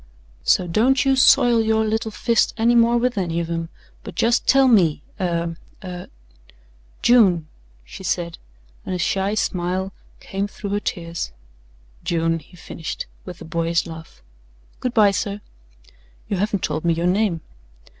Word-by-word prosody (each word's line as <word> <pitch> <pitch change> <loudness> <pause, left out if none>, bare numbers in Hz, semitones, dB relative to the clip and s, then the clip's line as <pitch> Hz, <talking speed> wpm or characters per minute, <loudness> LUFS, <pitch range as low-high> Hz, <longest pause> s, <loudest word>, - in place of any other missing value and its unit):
"So 180 - +3
don't 245 +10 +2
you 270 0 +4
soil 245 -3 +5
your 220 0 +2
little 220 +1 -1
fist 230 +2 +1
any 235 +1 +3
more 235 0 +4
with 240 -3 0
any 170 -2 -1
of 170 0 -3
'em, 165 -1 -3 0.3
but - - -9
just 235 +2 +2
tell 270 0 +6
me 170 - +3 0.2
er 170 -2 -1 0.3
er 180 -1 -7 0.5
" - - -31
"June," 190 -10 +5 0.4
she - - -11
said, 170 -1 -2 0.4
and 185 - -3
a - - -1
shy 195 +3 0
smile 185 0 -1 0.3
came 195 +1 -3
through 205 0 -7
her 205 - +1
tears. 170 - -4 0.7
"June," 165 0 0
he 175 +4 -18
finished 165 -1 -6 0.2
with 180 - -9
a - - -8
boyish 165 +1 0
laugh. 160 - -11 0.6
"Good 250 -1 -3
by 210 -3 +6
sir." 200 +1 -2 0.9
"You 200 - -1
haven't 200 0 -1
told 155 - -2
me 170 -1 +2
your 170 +1 -1
name." 180 -2 +1
185 Hz, 155 wpm, -22 LUFS, 165-220 Hz, 0.9 s, tell